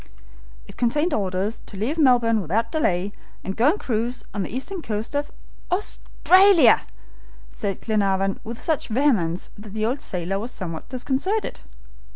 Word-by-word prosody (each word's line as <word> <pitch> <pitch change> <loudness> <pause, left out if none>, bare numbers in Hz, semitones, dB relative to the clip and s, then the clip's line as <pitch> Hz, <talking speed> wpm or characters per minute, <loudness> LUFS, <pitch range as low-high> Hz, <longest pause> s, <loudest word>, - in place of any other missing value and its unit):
"It - - -14
contained 295 +8 +1
orders 195 +1 -1
to 200 - -9
leave 260 +11 -1
Melbourne 240 -6 +4
without 220 +7 -1
delay, 195 - 0 0.3
and 190 - -4
go 245 +6 +4
and 395 +7 0
cruise 235 +1 -2
on 205 - -2
the 185 - -3
eastern 330 - -5
coast 215 -3 -4
of 290 +1 -1 0.2
" - - -26
"Australia!" 370 - +4 0.6
said 195 - -4
Glenarvan 195 -3 +1
with 230 +1 -7
such 315 -3 -1
vehemence 215 - +1
that 210 0 -10
the 215 0 0
old 255 +5 -1
sailor 185 +1 -2
was 230 +4 -4
somewhat 170 -9 -6
disconcerted. 275 - -1
225 Hz, 155 wpm, -23 LUFS, 195-285 Hz, 0.6 s, Melbourne